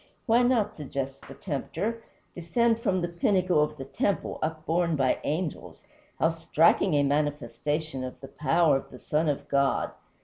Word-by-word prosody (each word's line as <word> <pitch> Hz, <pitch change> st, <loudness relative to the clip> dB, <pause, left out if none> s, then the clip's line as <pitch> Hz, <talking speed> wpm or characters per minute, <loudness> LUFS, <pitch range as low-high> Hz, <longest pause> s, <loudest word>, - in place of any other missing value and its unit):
"Why 235 Hz, 0 st, +4 dB
not," 240 Hz, -4 st, +2 dB
suggests 135 Hz, -2 st, -4 dB
the -, -, -10 dB
tempter, 220 Hz, +10 st, -3 dB, 0.3 s
"descend 225 Hz, +7 st, +1 dB
from 185 Hz, -5 st, 0 dB
the 175 Hz, -, 0 dB
pinnacle 180 Hz, -1 st, +2 dB
of 150 Hz, 0 st, -1 dB
the 135 Hz, -, -6 dB
temple 195 Hz, +8 st, -1 dB
upborne 160 Hz, +2 st, 0 dB
by 135 Hz, -3 st, +1 dB
angels? 160 Hz, +1 st, -3 dB, 0.3 s
How 160 Hz, -, +3 dB
striking 165 Hz, +1 st, +3 dB
a 145 Hz, -, +4 dB
manifestation 145 Hz, 0 st, -1 dB
of 130 Hz, -1 st, -7 dB
the 135 Hz, -, -9 dB
power 155 Hz, +1 st, +2 dB
of -, -, -9 dB
the 125 Hz, -, -11 dB
Son 150 Hz, +4 st, 0 dB
of 145 Hz, -, -2 dB
God!" 140 Hz, -1 st, +1 dB
155 Hz, 160 wpm, -27 LUFS, 145-180 Hz, 0.3 s, Why